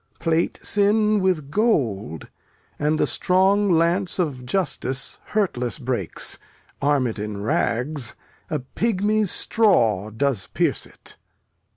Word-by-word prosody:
Plate 165 Hz, 0 st, 0 dB
sin 210 Hz, +1 st, +3 dB
with 175 Hz, -7 st, 0 dB
gold, 115 Hz, -, 0 dB, 0.5 s
And 150 Hz, +1 st, +1 dB
the -, -, +3 dB
strong 195 Hz, +2 st, +2 dB
lance 175 Hz, +3 st, +2 dB
of 140 Hz, -9 st, -2 dB
justice 135 Hz, -7 st, -1 dB
hurtless 150 Hz, -, -1 dB
breaks; 120 Hz, -, -3 dB, 0.4 s
Arm 140 Hz, -2 st, +2 dB
it 115 Hz, -3 st, -3 dB
in 105 Hz, -1 st, -5 dB
rags, 125 Hz, +4 st, 0 dB, 0.3 s
a 155 Hz, -, -1 dB
pygmy's 210 Hz, -, 0 dB
straw 115 Hz, -, +3 dB
does 110 Hz, -4 st, -1 dB
pierce -, -, 0 dB
it. -, -, -9 dB
155 Hz, 110 wpm, -23 LUFS, 120-195 Hz, 0.5 s, sin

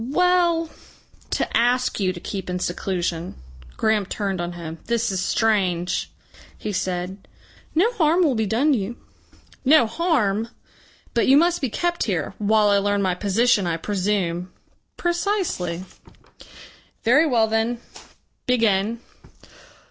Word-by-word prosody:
"Well 345 Hz, 0 st, +2 dB, 0.6 s
to -, -, -1 dB
ask 245 Hz, +1 st, +2 dB
you 190 Hz, -2 st, +1 dB
to 180 Hz, -, -8 dB
keep 190 Hz, +1 st, -5 dB
in 180 Hz, -, -1 dB
seclusion." 175 Hz, -1 st, -3 dB, 0.4 s
Graham 220 Hz, -3 st, +1 dB
turned 195 Hz, -3 st, -2 dB
on 175 Hz, 0 st, -4 dB
him. 165 Hz, -2 st, -7 dB
"This 235 Hz, -2 st, 0 dB
is 190 Hz, -, -1 dB
strange!" 185 Hz, -4 st, 0 dB, 0.5 s
he 210 Hz, -, -4 dB
said. 185 Hz, +1 st, -3 dB, 0.5 s
"No 420 Hz, +9 st, +3 dB
harm 340 Hz, -3 st, +3 dB
will 295 Hz, -5 st, +3 dB
be 220 Hz, -2 st, 0 dB
done 265 Hz, +8 st, +2 dB
you." 230 Hz, 0 st, -2 dB, 0.7 s
"No 275 Hz, -1 st, +6 dB
harm!" 230 Hz, -, 0 dB, 0.7 s
"But 235 Hz, -, +2 dB
you 270 Hz, -, +7 dB
must 345 Hz, +2 st, +3 dB
be 265 Hz, -, 0 dB
kept 345 Hz, +8 st, -1 dB
here 180 Hz, -8 st, -2 dB
" -, -, -31 dB
"While 210 Hz, 0 st, +3 dB
I 200 Hz, 0 st, +4 dB
learn 205 Hz, 0 st, 0 dB
my 185 Hz, -1 st, +1 dB
position, 205 Hz, +1 st, +2 dB
I 165 Hz, -1 st, -1 dB
presume." 185 Hz, -2 st, -1 dB, 0.5 s
"Precisely." 345 Hz, -, -1 dB, 1.2 s
"Very 290 Hz, +8 st, +5 dB
well 235 Hz, -5 st, +3 dB
then. 225 Hz, +2 st, 0 dB, 0.7 s
Begin. 225 Hz, -2 st, +1 dB
215 Hz, 135 wpm, -23 LUFS, 185-265 Hz, 1.2 s, you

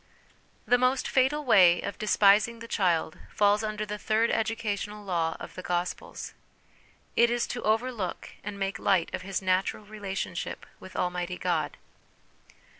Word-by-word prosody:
The 245 Hz, -, +4 dB
most 255 Hz, +2 st, +2 dB
fatal 280 Hz, +3 st, +2 dB
way 180 Hz, -7 st, +6 dB
of 200 Hz, -, -5 dB
despising 210 Hz, +2 st, +4 dB
the 230 Hz, 0 st, -9 dB
child 175 Hz, -7 st, 0 dB
falls 205 Hz, +1 st, +3 dB
under 215 Hz, 0 st, -2 dB
the 210 Hz, 0 st, -5 dB
third 220 Hz, +2 st, +2 dB
educational 210 Hz, -2 st, -2 dB
law 165 Hz, -3 st, -1 dB
of -, -, -8 dB
the 185 Hz, -, -7 dB
Gospels; 175 Hz, 0 st, -3 dB, 0.8 s
it 235 Hz, 0 st, +5 dB
is 240 Hz, 0 st, +1 dB
to 245 Hz, -, -5 dB
over 225 Hz, +4 st, +1 dB
look 205 Hz, -7 st, -5 dB
and 205 Hz, 0 st, -5 dB
make 195 Hz, +2 st, -2 dB
light 190 Hz, -4 st, +2 dB
of 185 Hz, -, -3 dB
his 190 Hz, 0 st, -3 dB
natural 185 Hz, +3 st, 0 dB
relationship 205 Hz, -2 st, -5 dB
with 190 Hz, -, -12 dB
Almighty 180 Hz, 0 st, -2 dB
God. 160 Hz, -5 st, -1 dB
205 Hz, 150 wpm, -28 LUFS, 185-225 Hz, 0.8 s, way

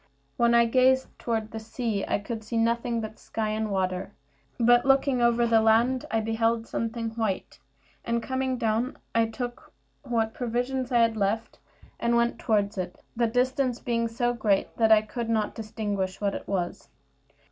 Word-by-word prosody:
When 235 Hz, 0 st, +3 dB
I 235 Hz, 0 st, +6 dB
gazed 260 Hz, +2 st, +3 dB
toward 225 Hz, -2 st, -2 dB
the 220 Hz, -, -5 dB
sea 220 Hz, -2 st, -3 dB
I -, -, +1 dB
could 220 Hz, +2 st, -6 dB
see 230 Hz, +2 st, -3 dB
nothing 235 Hz, +1 st, +1 dB
but 220 Hz, 0 st, -7 dB
sky 220 Hz, -1 st, -3 dB
and 215 Hz, 0 st, -1 dB
water; 185 Hz, 0 st, -2 dB, 0.5 s
but 240 Hz, +1 st, +5 dB
looking 270 Hz, -1 st, +3 dB
over 235 Hz, 0 st, +3 dB
the 225 Hz, -1 st, +4 dB
land 230 Hz, +4 st, +3 dB
I 225 Hz, -, +1 dB
beheld 225 Hz, +1 st, 0 dB
something 230 Hz, 0 st, -3 dB
white; 220 Hz, -4 st, -3 dB, 0.4 s
and 235 Hz, 0 st, -1 dB
coming 260 Hz, -1 st, -1 dB
down, 230 Hz, +1 st, 0 dB, 0.2 s
I 230 Hz, 0 st, +3 dB
took 240 Hz, +2 st, -6 dB, 0.3 s
what 225 Hz, -2 st, -1 dB
provision 250 Hz, +2 st, -2 dB
I 245 Hz, -, +2 dB
had 230 Hz, -1 st, +2 dB
left, 215 Hz, +2 st, -1 dB, 0.4 s
and 235 Hz, 0 st, +1 dB
went 235 Hz, 0 st, +1 dB
toward 205 Hz, -2 st, +1 dB
it, 180 Hz, -1 st, -5 dB, 0.2 s
the 235 Hz, 0 st, +2 dB
distance 250 Hz, +1 st, 0 dB
being 230 Hz, -1 st, 0 dB
so 240 Hz, +1 st, 0 dB
great 210 Hz, -4 st, 0 dB
that 225 Hz, -1 st, +3 dB
I 215 Hz, -1 st, +7 dB
could 230 Hz, +2 st, -5 dB
not 215 Hz, -2 st, 0 dB
distinguish 205 Hz, -4 st, -3 dB
what 200 Hz, -1 st, 0 dB
it -, -, -6 dB
was. 180 Hz, -3 st, -3 dB
230 Hz, 170 wpm, -27 LUFS, 220-240 Hz, 0.5 s, I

